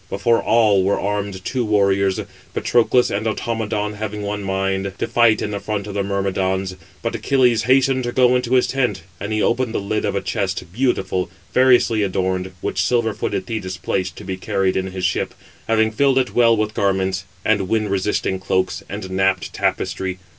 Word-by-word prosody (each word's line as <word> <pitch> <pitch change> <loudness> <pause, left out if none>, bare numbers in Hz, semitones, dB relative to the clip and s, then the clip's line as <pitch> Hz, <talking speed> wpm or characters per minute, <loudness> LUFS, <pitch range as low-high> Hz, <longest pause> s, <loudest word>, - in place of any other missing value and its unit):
Before 115 +3 +2
all 105 -4 +4
were 100 +2 +1
armed 100 -2 -3
two 130 -2 -1
warriors. 100 -3 +2 0.4
Patroclus 120 +1 +3
and 105 +3 -1
Automedon, 110 -2 -2
having 105 0 -5
one 105 0 -3
mind, 95 0 -1
to - - -2
fight 115 -2 +3
in 105 - -3
the 100 - -3
front 105 -1 -3
of 105 - -6
the 100 - 0
Myrmidons. 95 -1 -1 0.3
But - - -1
Achilles 125 -4 +2
hastened 130 0 +3
to 120 - -2
go 125 0 +4
into 125 0 +1
his 125 - +4
tent; 125 -11 -1 0.2
and 105 +2 -4
he 110 -1 +1
opened 120 -1 0
the - - +1
lid 105 +2 -2
of 100 -1 -1
a 100 - 0
chest, 95 -5 -2
beautiful, 95 -7 0 0.2
variously 125 -3 +4
adorned, 95 -1 -1
which 95 - -1
silver 115 -1 +1
footed 100 -2 -3
Thetis 95 -4 -4
placed, 90 +1 -2
to - - -10
be 95 0 -4
carried 95 -2 0
in 95 0 -1
his 95 0 -4
ship, 95 - -1 0.3
having 110 -1 +2
filled 135 +3 +2
it 130 -2 +1
well 115 -2 +4
with 105 0 -1
garments, 95 -1 0 0.2
and 100 -3 +1
wind 110 -3 0
resisting 95 -1 0
cloaks, 95 0 -1
and 100 -1 -5
napped 95 -2 0
tapestry. 95 -1 -1
105 Hz, 185 wpm, -20 LUFS, 95-115 Hz, 0.4 s, all